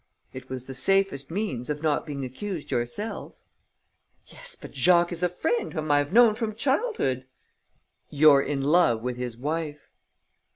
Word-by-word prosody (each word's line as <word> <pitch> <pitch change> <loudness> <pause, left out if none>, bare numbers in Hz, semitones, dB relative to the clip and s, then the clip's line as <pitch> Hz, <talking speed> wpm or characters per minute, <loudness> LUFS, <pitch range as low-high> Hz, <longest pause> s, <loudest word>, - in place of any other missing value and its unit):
"It 130 0 -10
was 130 -1 -5
the 135 - -8
safest 185 0 +1
means 165 - -3
of 150 +1 -3
not 155 +1 0
being 140 -2 -4
accused 160 +6 -6
yourself." 120 - -3 0.9
"Yes, - - -7
but - - -11
Jacques 175 +6 +4
is 170 - -5
a 180 - +2
friend 325 - -2
whom 155 -2 -2
I 145 - +5
have 145 +2 -2
known 230 +1 +6
from 220 -1 -3
childhood." 265 - 0 0.8
"You're 145 -1 +6
in 140 -1 -2
love 140 -7 +3
with 125 0 -3
his 125 -2 -5
wife." 150 +2 -4
150 Hz, 160 wpm, -26 LUFS, 130-195 Hz, 0.9 s, known